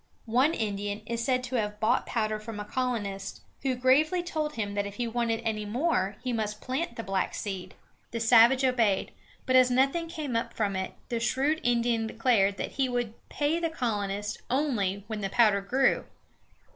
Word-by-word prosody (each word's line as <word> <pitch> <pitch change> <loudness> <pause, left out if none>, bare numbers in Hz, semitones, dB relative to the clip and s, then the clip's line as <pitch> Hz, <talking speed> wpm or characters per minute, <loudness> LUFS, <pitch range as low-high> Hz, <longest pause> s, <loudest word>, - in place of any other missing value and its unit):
One 255 +8 +3
Indian 205 -1 -3
is 235 +1 -2
said 255 +1 +1
to 250 0 -2
have 210 -1 -2
bought 230 +3 +2
powder 215 -2 -1
from 215 0 -7
a 210 - -4
colonist, 210 -5 -3 0.2
who 260 -1 0
gravely 295 +8 +3
told 310 -3 -2
him 205 -3 -2
that 205 0 -1
if 200 - -9
he 240 +2 -2
wanted 230 -1 -1
any 215 -1 -1
more 210 - 0
he 250 -1 -1
must 215 -2 -2
plant 260 0 -3
the 230 - -5
black 195 -2 -1
seed. 185 -3 -5 0.3
The 230 - -4
savage 240 +3 +6
obeyed, 230 -7 +2 0.3
but 255 - +2
as 255 -1 +7
nothing 275 +7 +2
came 310 -7 -4
up 230 - -2
from 205 -3 0
it, 190 0 -3
the 235 -2 -1
shrewd 275 +6 +1
Indian 235 -2 +1
declared 220 -4 +2
that - - -3
he 265 -1 0
would 240 -3 -1 0.2
pay 300 +3 0
the 335 -1 0
colonist 210 -7 -2
only 220 -8 0
when 215 -1 -5
the 195 - -2
powder 210 -2 +4
grew! 260 +7 +2
230 Hz, 185 wpm, -28 LUFS, 210-260 Hz, 0.3 s, as